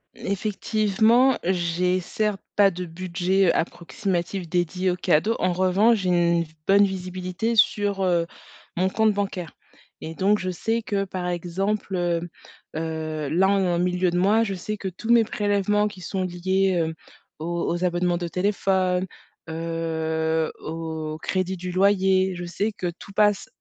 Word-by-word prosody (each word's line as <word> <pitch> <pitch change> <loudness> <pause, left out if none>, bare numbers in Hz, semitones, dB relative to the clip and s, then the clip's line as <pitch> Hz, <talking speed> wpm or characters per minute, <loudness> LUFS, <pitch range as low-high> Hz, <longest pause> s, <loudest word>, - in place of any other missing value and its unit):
Effectivement, 215 +5 +2
j'ai 180 0 +1
certes 210 +2 -2 0.2
pas 200 -1 +6
de 180 -1 -5
budget, 185 +2 0
heu, - - +3
approximatif 175 +1 -2
dédié 180 +1 0
aux 180 - -3
cadeaux. 195 +6 +2
En 180 -1 +1
revanche, 195 +5 +3
j'ai 185 -1 -1
une 170 -1 +2 0.2
bonne 200 +1 +6
visibilité 185 +3 -2
sur, 200 -2 +2
heu, 170 -2 +2 0.5
mon 185 +2 +1
compte 220 +1 +2
bancaire, 195 -5 -3 0.5
et 160 - -6
donc 200 +4 +2
je 185 - -3
sais 225 +6 -1
que, 200 -2 -1
par 180 -1 -4
exemple, 190 +3 -2
heu 175 -1 -1 0.5
heu, 155 -2 -3
là 180 +5 +3
on 200 -1 +2
est - - +1
en 170 - 0
milieu 180 0 +1
de 175 - -1
mois, 210 +5 +4
je 200 - -2
sais 195 +3 -4
que 195 -2 -4
tous 220 +6 -9
mes 235 -1 +6
prélèvements 210 0 +1
qui 190 -3 -9
sont 190 +2 -3
liés, 185 +2 0
heu, 160 0 -1 0.5
aux 170 +1 -3
aux 175 +1 -1
abonnements 175 0 +1
de 175 -1 -3
téléphone, 185 -1 0 0.4
heu, 160 -1 -1
au 160 -1 -5
crédit 185 0 -1
du 180 0 -5
loyer, 190 -1 +3
je 175 - -6
sais 200 +5 -2
que 180 -3 -3
tout 195 - -12
passe, 210 -1 +2
185 Hz, 160 wpm, -24 LUFS, 175-200 Hz, 0.5 s, pas